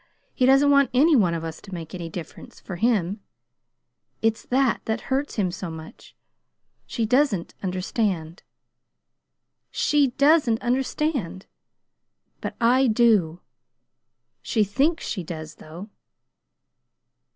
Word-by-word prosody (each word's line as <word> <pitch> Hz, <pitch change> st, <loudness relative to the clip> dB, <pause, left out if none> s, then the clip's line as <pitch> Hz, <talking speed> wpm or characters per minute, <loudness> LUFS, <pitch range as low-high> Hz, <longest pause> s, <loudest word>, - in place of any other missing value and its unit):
He 255 Hz, -, +2 dB
doesn't 275 Hz, +2 st, +5 dB
want 280 Hz, -1 st, +4 dB
any 300 Hz, +5 st, +5 dB
one 180 Hz, -9 st, +3 dB
of 165 Hz, -, -4 dB
us 160 Hz, -1 st, -7 dB
to 195 Hz, -, -13 dB
make 165 Hz, -2 st, -8 dB
any 170 Hz, -2 st, -6 dB
difference 165 Hz, -1 st, -10 dB
for 180 Hz, -, -8 dB
him. 205 Hz, -2 st, 0 dB, 1.0 s
It's 225 Hz, 0 st, +1 dB
that 260 Hz, -1 st, +1 dB
that 220 Hz, +1 st, -2 dB
hurts 280 Hz, +2 st, -1 dB
him 190 Hz, -5 st, 0 dB
so. 165 Hz, -4 st, -7 dB, 1.0 s
She 230 Hz, -, -2 dB
doesn't 235 Hz, -, +1 dB
understand. 185 Hz, -2 st, -2 dB, 1.3 s
She 295 Hz, -2 st, +2 dB
doesn't 280 Hz, -6 st, +4 dB
understand! 250 Hz, -, -2 dB, 1.0 s
But -, -, -5 dB
I 255 Hz, +3 st, +4 dB
do. 215 Hz, -8 st, +2 dB, 1.0 s
She 220 Hz, -4 st, +1 dB
thinks 275 Hz, -, 0 dB
she 190 Hz, -5 st, -3 dB
does, 155 Hz, -2 st, -8 dB
though!" 175 Hz, +7 st, -11 dB
220 Hz, 115 wpm, -24 LUFS, 175-265 Hz, 1.3 s, doesn't